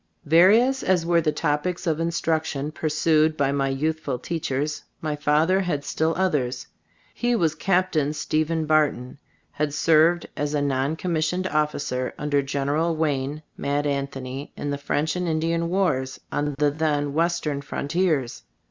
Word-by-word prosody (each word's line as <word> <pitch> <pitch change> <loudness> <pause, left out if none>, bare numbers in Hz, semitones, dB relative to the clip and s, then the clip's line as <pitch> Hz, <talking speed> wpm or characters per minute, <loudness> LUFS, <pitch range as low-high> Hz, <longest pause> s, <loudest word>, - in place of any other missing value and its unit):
Various 210 - +5
as 180 -3 +1
were 170 0 +3
the 155 -1 +1
topics 150 +5 -1
of 160 -2 0
in 165 0 0
struction 160 -3 -1
pursued 155 0 +1
by 140 -1 +2
my 135 -1 0
youthful 155 0 -1
teachers, 150 +1 -3 0.2
my 155 -2 -2
father 155 +5 +2
had 160 -7 -2
still 160 +1 0
others. 140 -9 0 0.5
He 240 0 0
was 165 -8 +2
"Captain" 175 -3 +1
Stephen 155 +1 -1
Barton, 145 -4 +1 0.3
had 145 -1 -2
served 165 +2 +3
as 145 +1 -2
a - - +2
non 135 +2 0
commissioned 170 +1 -1
of 150 -4 +1
ficer, 130 -3 -3
under 145 -1 +1
General 145 +4 0
Wayne 150 -1 -1
(Mad 145 +1 -1
An 140 -1 0
thony) 135 +1 -7
in 145 - -3
the 140 - -3
French 145 +2 -1
and 180 0 -2
Indian 165 +1 0
Wars 165 -9 0
on 145 -1 -1
the 145 -1 +2
then 145 -2 -1
Western 165 -3 0
frontiers. 145 -2 -1
155 Hz, 155 wpm, -24 LUFS, 145-165 Hz, 0.5 s, Various